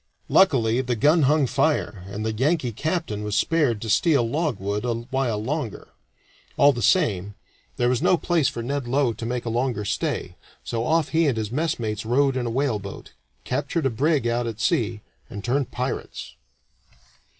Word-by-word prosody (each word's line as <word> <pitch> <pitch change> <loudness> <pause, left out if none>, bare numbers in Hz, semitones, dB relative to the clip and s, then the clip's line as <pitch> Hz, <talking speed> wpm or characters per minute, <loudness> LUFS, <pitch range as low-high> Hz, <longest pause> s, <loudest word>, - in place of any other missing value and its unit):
Luckily 130 -10 +4
the 125 -2 -1
gun 150 +8 +4
hung 150 -2 +3
fire, 115 - 0
and 105 +2 -5
the 110 - -1
Yankee 135 +2 +1
captain 155 - -2
was 105 -1 -2
spared 145 -9 +2
to 110 - -5
steal 140 -4 +3
logwood 115 - -2
a 120 - 0
while 120 -1 -2
longer. 125 - -4 0.7
All 145 0 +6
the 120 - -4
same, 105 - +2 0.4
that 120 - +2
was 125 -1 +1
no 180 - +4
place 165 -5 +1
for 115 - -4
Ned 140 +1 -3
Low 130 -1 +1
to 115 +2 -7
make 120 0 -3
a - - -2
longer 120 -2 -1
stay, 90 -2 -2 0.3
so 115 -1 -2
off 160 +2 +2
he 160 0 +2
and 130 -5 0
his 110 -1 -3
messmates 120 -8 -2
rowed 135 +4 +2
in 125 -2 -1
a - - -1
whaleboat, 115 -6 -3 0.3
captured 145 +4 -2
a 135 - +2
brig 140 +2 +1
out 120 0 0
at 115 -2 -5
sea, 110 -1 0 0.3
and 100 - -7
turned 130 +2 0
pirates. 125 +2 -5
125 Hz, 175 wpm, -24 LUFS, 110-145 Hz, 0.7 s, All